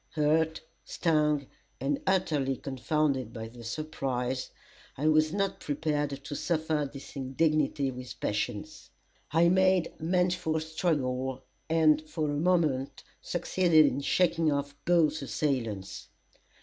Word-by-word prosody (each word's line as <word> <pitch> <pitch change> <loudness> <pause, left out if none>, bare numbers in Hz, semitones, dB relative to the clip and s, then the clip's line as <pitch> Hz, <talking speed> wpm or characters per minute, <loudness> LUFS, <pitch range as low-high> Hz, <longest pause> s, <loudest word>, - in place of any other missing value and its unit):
Hurt, 160 +1 +2 0.2
stung, 150 -4 +1 0.3
and 140 +2 -1
utterly 150 -8 +1
confounded 135 0 -1
by 110 -2 -6
the 120 0 -12
surprise, 130 -1 -3 0.5
I 150 +4 0
was 155 0 +4
not 195 +1 -1
prepared 145 -2 -2
to 145 - -5
suffer 155 -3 -1
this 140 +1 -10
indignity 140 +1 +1
with 125 -1 -9
patience. 105 0 -3 0.4
I 165 +2 +4
made 185 -1 +3
manful 180 -1 +1
struggle, 130 -5 -1 0.3
and 155 -2 +4
for 155 -3 -1
a 145 - -1
moment 155 -6 +1 0.2
succeeded 175 -2 +3
in 140 0 0
shaking 165 +1 +2
off 140 0 -2
both 160 -3 +3
assailants. 120 -9 -2
150 Hz, 115 wpm, -29 LUFS, 135-160 Hz, 0.5 s, was